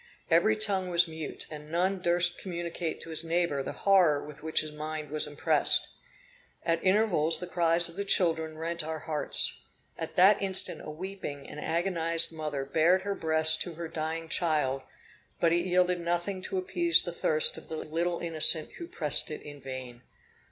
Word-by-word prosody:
Every 175 +7 +4
tongue 200 -4 0
was 175 0 +3
mute; 160 -2 -3
and 150 0 -10
none 185 +3 0
durst 175 0 +1
communicate 170 -2 -5
to 165 - -8
his 160 +1 +2
neighbor 165 -4 -1
the - - -5
horror 180 -7 +4
with 150 -1 -12
which 160 0 +1
his 155 - -7
mind 155 -1 -6
was 155 0 0
impressed. 145 0 +3 0.8
At 165 0 0
intervals 185 -5 +2
the 180 - -5
cries 170 -1 +2
of 170 +2 -12
the 200 - -2
children 160 -5 +1
rent 170 +1 -3
our 160 +1 -5
hearts. 155 -1 +3 0.4
At - - -6
that 190 +3 +5
instant 190 -1 +1
a - - -8
weeping 155 -3 -7
and 150 - -9
agonized 170 0 0
mother 150 -4 -5
bared 165 +6 +2
her 200 0 -2
breast 160 -2 +3
to 175 -3 -5
her 170 0 -6
dying 160 +1 -4
child, 150 -6 -1 0.6
but 170 -1 +2
it 175 +1 0
yielded 180 0 +1
nothing 175 +3 -2
to 385 - -3
appease 345 -2 +3
the - - -6
thirst 475 0 +2
of - - -19
the 160 - -5
little 170 +3 -3
innocent 160 -1 +4
who 340 - -7
pressed 150 - 0
it 150 - -8
in 145 -1 -11
vain. 130 -2 -8
165 Hz, 180 wpm, -28 LUFS, 155-180 Hz, 0.8 s, that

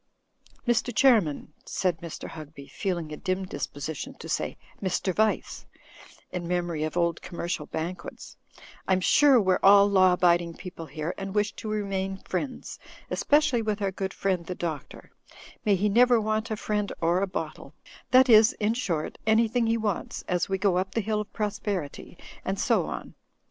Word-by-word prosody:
"Mr. 240 +1 +2
Qiairman," 220 - +3
said 180 -4 -1
Mr. 170 -1 -7
Hugby, 155 -3 -10
feeling 175 -6 -3
a - - -6
dim 190 +1 -2
disposition 145 -2 -5
to - - -10
say - - -2 0.2
"Mr. 190 0 -1
Vice," 215 +3 0 0.6
in 175 -2 -4
memory 175 -3 -1
of 155 +2 -3
old 170 -2 +1
com 170 - -9
mercial 170 -3 -3
banquets, 170 +3 -6 0.5
"I'm 190 -1 +3
sure, 270 +7 +5
we're 185 -3 +2
all 200 +1 +7
law 185 -2 +5
abiding 175 -2 +2
people 170 -3 -8
here, 155 +4 -4
and 195 +1 -5
wish 210 0 +2
to 215 - -5
remain 195 -2 -2
friends, 220 +8 -5 0.3
especially 295 -5 +2
with 215 -1 -1
our 200 -2 0
good 190 0 -3
friend 190 -3 -1
the 180 - -4
Doctor; 160 -5 -6 0.5
may 205 -2 +4
he 200 +3 +1
never 240 +3 +5
want 215 +1 -1
a 220 - -2
friend 210 -1 -2
or 170 +3 +2
a 200 - +1
bottle 185 - -6 0.2
— - - -22
^that 255 +1 +7
is 220 -2 +7
in 215 +1 0
short, 175 -10 -3
anything 225 +1 +3
he 225 +1 +2
wants, 215 -4 -3
as 180 0 0
we 195 - 0
go 190 -2 +2
up 190 +1 -4
the 225 - +2
hill 210 +1 -1
of 210 - -9
prosperity, 205 -7 -4 0.3
and - - -2
so - - +2
on. - - -6
190 Hz, 175 wpm, -27 LUFS, 175-215 Hz, 0.6 s, all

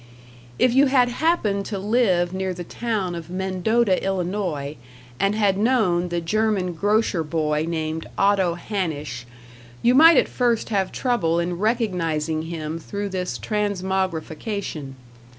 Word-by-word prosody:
If 250 - +3
you 275 +2 +5
had 255 -2 +3
happened 240 - 0
to 205 - -3
live 190 -4 +1
near 190 -1 -2
the 175 - -6
town 210 -2 -2
of 170 -1 -7
Mendota, 190 +3 +1
Illinois, 180 -6 -2 0.4
and 195 +2 +2
had 200 -3 +2
known 205 -7 +2
the 175 0 -1
German 195 0 0
grocer 205 -1 +1
boy 155 0 -1
named 160 -1 -3
Otto 195 -4 +3
Hanisch, 155 - -4 0.6
you 240 - +5
might 325 +5 +8
at - - +4
first 240 -3 0
have 195 -4 0
trouble 175 -10 0
in 175 0 -2
recognizing 170 -9 0
him 160 -1 -5
through 200 +4 -5
this 185 -1 -3
transmogrification. 190 -6 -3
190 Hz, 135 wpm, -23 LUFS, 170-215 Hz, 0.6 s, might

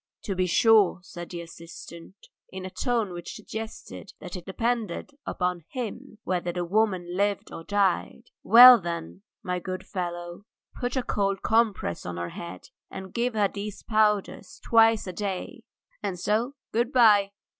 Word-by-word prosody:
"To 200 - -2
be 185 -1 0
sure," 215 +1 +5
said 175 -2 -9
the 170 -1 -6
assistant, 170 +1 -11 0.3
in 185 0 -7
a 185 - -6
tone 230 -6 -1
which 175 -1 -7
suggested 220 -2 -8
that 180 -1 -8
it 180 0 -9
depended 230 +1 -2 0.2
upon 180 -2 -2
him 250 0 -6
whether 180 -1 -1
the 175 0 -3
woman 185 -2 0
lived 200 +1 -1
or 165 - -8
died. 200 -1 -1
"Well, 245 +1 +10
then, 100 - -5 0.2
my 180 -1 -2
good 185 0 -6
fellow, 175 0 -5 0.3
put 245 +1 -3
a 255 - 0
cold 195 -3 -1
compress 220 - +1
on 90 -1 -6
her 85 0 -4
head, 170 0 -9 0.2
and 190 -1 -9
give 240 0 -1
her 205 -2 +3
these 205 +1 -7
powders 210 -3 0
twice 225 -1 +4
a 185 - -6
day, 195 -1 -5 0.4
and 180 -3 -3
so 230 +9 0 0.2
good 235 +3 0
bye. 210 -6 +5
195 Hz, 155 wpm, -26 LUFS, 175-220 Hz, 0.4 s, Well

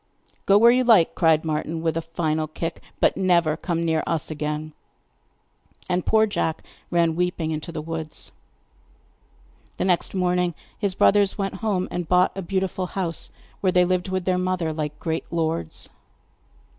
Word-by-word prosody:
'Go 200 - +6
where 235 +3 +7
you 255 +1 +3
like,' 220 -9 +5
cried 160 -2 +3
Martin 160 +1 -2
with 160 -1 0
a 165 - 0
final 160 -1 -2
kick; 165 +2 -5 0.2
'but - - +3
never 170 -5 +2
come 170 0 -2
near 160 -1 +1
us 160 -2 -2
again.' 150 0 -4 1.1
And 180 -1 -1
poor 220 0 +5
Jack 165 -6 -2 0.3
ran 170 -2 +2
weeping 180 -2 -1
into 155 +2 -4
the 155 -2 -5
woods. 160 -1 -6 1.5
The - - -1
next 180 +1 0
morning 180 -2 +1 0.2
his 200 -4 -2
brothers 200 -1 +3
went 195 -2 -2
home, 200 -5 0
and 175 -2 -3
bought 180 0 +3
a 195 - -3
beautiful 190 0 -2
house, 175 -4 -3 0.3
where 185 - +2
they 180 0 +4
lived 185 +1 0
with 185 -1 -2
their 185 -1 +1
mother 180 -3 -1
like 150 -1 -4
great 160 -1 -3
lords. 160 - -2
175 Hz, 160 wpm, -24 LUFS, 160-185 Hz, 1.5 s, where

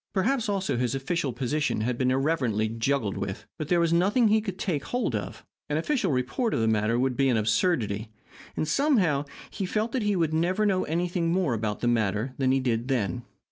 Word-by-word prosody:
Perhaps, 225 +4 +1
also, 195 -9 -1
his 125 +1 0
official 135 +1 -1
position 135 +1 -1
had 120 +3 0
been 130 +1 +1
irreverently 130 -6 +1
juggled 115 -1 -1
with. 95 -1 -4
But 155 - -3
there 175 +1 +3
was 170 -1 +2
nothing 205 +7 +3
he 215 +1 +4
could 195 -4 -5
take 155 -9 -2
hold 245 - -1
of. 105 - -5 0.2
An 150 - 0
official 205 - 0
report 135 - 0
of - - 0
the 110 - +1
matter 110 +1 +2
would 130 0 +1
be 135 0 +2
an 120 - +2
absurdity. 110 - 0 0.5
And, 155 - 0
somehow, 180 - +2 0.3
he 195 - -3
felt 215 +4 -1
that 260 - -1
he 210 -1 +1
would 165 -3 0
never 180 +6 +1
know 190 -3 +1
anything 170 +1 -1
more 175 -7 +1
about 110 -2 -2
the 120 - 0
matter 110 +1 0
than 130 -1 +2
he 135 - +3
did 120 -2 -1
then. 125 -2 -1
140 Hz, 210 wpm, -27 LUFS, 120-185 Hz, 0.5 s, he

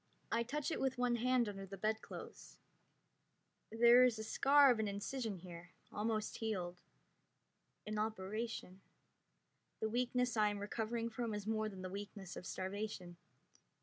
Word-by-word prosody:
I 230 - +2
touch 290 +7 -2
it - - -2
with 265 -1 +1
one 245 -1 +2
hand 250 0 +3
under 195 -1 -5
the 195 +1 -7
bedclothes. 215 +3 -4 1.1
There 235 +2 +7
is 250 -3 +4
the 220 - -5
scar 275 +4 +6
of 235 - +1
an 220 - +1
incision 205 +1 -3
there, 175 -1 -10 0.2
almost 215 0 -1
healed. 180 -5 -2 1.0
An 215 0 -2
operation. 215 -2 -3 1.0
The 220 - 0
weakness 250 +1 +1
I 210 -1 +4
am 205 - -3
recovering 230 +3 -2
from 225 -1 -2
is 205 -1 -4
more 215 0 0
than 190 -2 -8
the - - -2
weakness 200 -1 -6
of 180 - -7
starvation. 190 -2 -4
220 Hz, 150 wpm, -38 LUFS, 200-235 Hz, 1.1 s, There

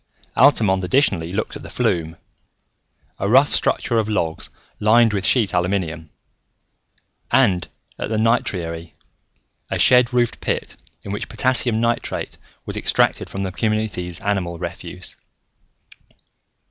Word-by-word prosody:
Altamont 105 -9 +4
additionally 90 - +1
looked 95 - -3
at - - -8
the - - -10
flume, 80 -1 -1 1.0
a 100 - -1
rough 135 +5 +5
structure 120 -6 +1
of 110 -1 -1
logs 80 -6 -2 0.3
lined 110 +1 +4
with 100 -2 -1
sheet 110 -8 +3
aluminum; 90 -3 -1 1.2
and 100 -9 +3 0.3
at - - -3
the 110 - -1
nitriary, 85 -7 -1 0.8
a - - -1
shed 125 0 +5
roofed 120 -2 0
pit - - -3 0.3
in 100 - -7
which 100 - -4
potassium 125 -3 +1
nitrate 115 0 -2 0.3
was - - -5
extracted - - +2
from 95 - -4
the 95 - -3
community's 105 -4 -2
animal 95 -4 -2
refuse. - - -7
100 Hz, 120 wpm, -21 LUFS, 90-115 Hz, 1.2 s, rough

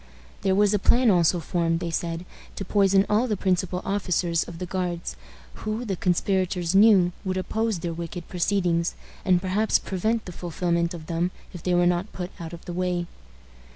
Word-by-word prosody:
There 190 -1 +2
was 205 +1 +4
a 210 - +2
plan 240 +3 +4
also 175 -1 +3
formed, 165 0 0
they 170 -1 -3
said, 165 +1 -3 0.3
to 195 - -5
poison 195 0 +4
all 220 +4 +2
the 210 -4 -1
principal 185 -1 0
officers 180 -4 0
of 170 - -9
the 180 - -4
Guards, 180 -1 -3 0.5
who, 215 +3 -3
the 195 -4 -1
conspirators 180 0 0
knew, 195 -3 +6
would 185 -1 -2
oppose 220 +2 -1
their 170 0 -3
wicked 170 +1 -6
proceedings, 175 -2 0 0.3
and 185 -3 +4
perhaps 195 +4 +2
prevent 220 +4 -1
the 180 - -7
fulfillment 170 0 -1
of 160 -2 -9
them 170 +2 0 0.2
if 175 - -8
they 180 +1 +1
were 175 0 +4
not 175 +3 +1
put 180 0 -5
out 165 -1 -6
of 170 -1 -10
the 175 - -5
way. 180 -1 -1
180 Hz, 185 wpm, -25 LUFS, 170-195 Hz, 0.5 s, knew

